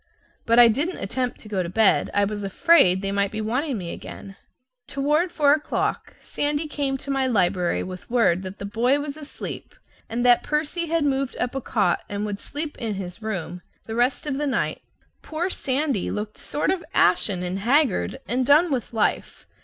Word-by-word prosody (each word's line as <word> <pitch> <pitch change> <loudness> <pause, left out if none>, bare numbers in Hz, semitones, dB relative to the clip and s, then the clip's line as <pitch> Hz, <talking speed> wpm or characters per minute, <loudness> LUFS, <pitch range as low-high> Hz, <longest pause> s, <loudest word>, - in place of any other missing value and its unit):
But 230 +1 +4
I 240 -1 +9
didn't 285 +11 0
attempt 250 +6 -2
to - - -12
go 200 -3 -1
to 170 - -3
bed; 215 +3 +3
I 205 0 +4
was 205 0 -4
afraid 195 - +4
they 195 - -1
might 200 0 +1
be 215 - -4
wanting 250 +5 -1
me 175 -3 -5
again. 195 -1 -9 0.5
Toward 300 +6 +1
four 290 -3 +4
o'clock 300 0 -2
Sandy 290 +2 -2
came 280 -2 -2
to 275 +1 -6
my 270 -1 +1
library 180 -6 +1
with 185 0 -8
word 230 -7 +3
that 190 +1 -7
the 200 - -6
boy 240 +7 +1
was 290 -1 -5
asleep 300 -2 -8 0.3
and 240 +2 -1
that 245 -1 +6
Percy 310 +3 -1
had 330 -1 +1
moved 275 -2 -1
up 245 - -1
a 270 - -3
cot 215 -3 0
and 205 +1 -3
would 205 -1 -4
sleep 295 +1 -5
in 225 -4 -2
his 185 +1 -7
room 180 -5 -4 0.2
the 220 - -6
rest 245 +5 +1
of 285 -2 -2
the 295 - 0
night. 250 -4 -1 0.4
Poor 340 +4 -3
Sandy 270 - -1
looked 210 0 -5
sort 300 - -1
of 370 -2 -2
ashen 185 -4 +3
and 180 +2 -3
haggard 265 +3 +1
and 255 +2 0
done 300 +6 +5
with 250 -3 -2
life. 220 - -1
245 Hz, 195 wpm, -24 LUFS, 200-290 Hz, 0.5 s, I